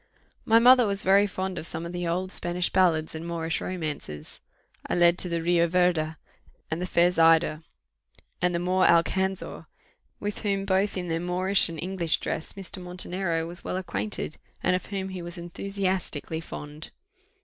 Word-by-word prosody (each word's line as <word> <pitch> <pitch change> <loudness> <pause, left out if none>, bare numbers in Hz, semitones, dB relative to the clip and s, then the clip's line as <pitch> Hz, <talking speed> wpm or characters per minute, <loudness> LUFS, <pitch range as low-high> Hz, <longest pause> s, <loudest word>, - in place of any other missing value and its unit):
My 225 - +5
mother 245 0 +7
was 200 +1 0
very 200 +2 +5
fond 190 -1 -3
of 160 - -3
some 165 +1 -3
of 170 - -5
the 175 -1 -3
old 185 +2 -1
Spanish 175 -1 -1
ballads 165 -4 +2
and 160 0 -6
Moorish 165 -1 -2
romances: 150 - -5 0.5
I - - -1
led 175 0 +4
to 180 - +1
the 170 -1 -1
Rio 170 0 +3
Verde, 170 -3 +1 0.6
and 160 +2 -2
the 180 - -2
fair 175 0 +4
Zaida, 165 -2 +4 0.8
and 180 0 +2
the - - +2
Moor 185 +2 +1
Alcanzor, 190 +3 +1 0.5
with 205 0 -4
whom 195 -2 -1
both 195 +1 +1
in 180 -1 -3
their 165 0 -1
Moorish 180 +2 +2
and 165 -1 -6
English 170 -3 0
dress 160 - -4
Mr. 195 -1 -8
Montenero 180 -2 -2
was 175 +1 -9
well - - -3
acquainted, 105 - -4 0.3
and 180 - +3
of 180 - -4
whom 195 -2 -4
he 185 -1 -6
was 175 +1 -6
enthusiastically 180 -3 -2
fond. 150 -1 -8
175 Hz, 170 wpm, -26 LUFS, 165-190 Hz, 0.8 s, mother